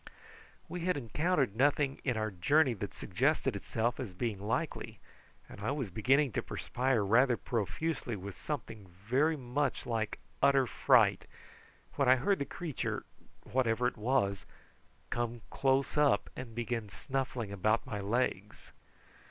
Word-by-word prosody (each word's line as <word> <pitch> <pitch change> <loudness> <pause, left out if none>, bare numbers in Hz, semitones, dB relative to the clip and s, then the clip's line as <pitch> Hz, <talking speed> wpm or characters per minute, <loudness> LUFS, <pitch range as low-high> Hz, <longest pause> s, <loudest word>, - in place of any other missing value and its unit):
We 180 - -5
had 180 -1 0
encountered 140 - 0
nothing 140 +2 +2
in 125 -4 0
our 110 -1 -1
journey 130 - +3
that 100 -2 -6
suggested 135 - 0
itself 115 +4 -1
as 105 -8 -5
being 110 -1 -2
likely, 125 +9 -2 0.5
and - - -11
I 110 - -1
was 135 -8 -2
beginning 135 +7 +3
to - - -1
perspire 125 -4 -1
rather 120 +4 +4
profusely 120 - -2
with 95 -1 -7
something 105 -3 -5
very 125 - 0
much 135 +1 -1
like 115 -3 -2 0.2
utter 135 -1 +5
fright, 115 - +3 0.7
when 140 -3 +3
I 130 - +8
heard 190 +10 +1
the 140 - -1
creature, 150 +1 -4 0.4
whatever 125 -1 +1
it 125 - +1
was, 105 -4 0 0.6
come 120 -1 -2
close 135 0 +1
up 145 -8 +3
and 120 -3 -7
begin 115 -2 -2
snuffling 130 +1 -3
about 110 +3 +1
my 105 -5 -4
legs. 105 -1 -2
120 Hz, 140 wpm, -32 LUFS, 110-135 Hz, 0.7 s, I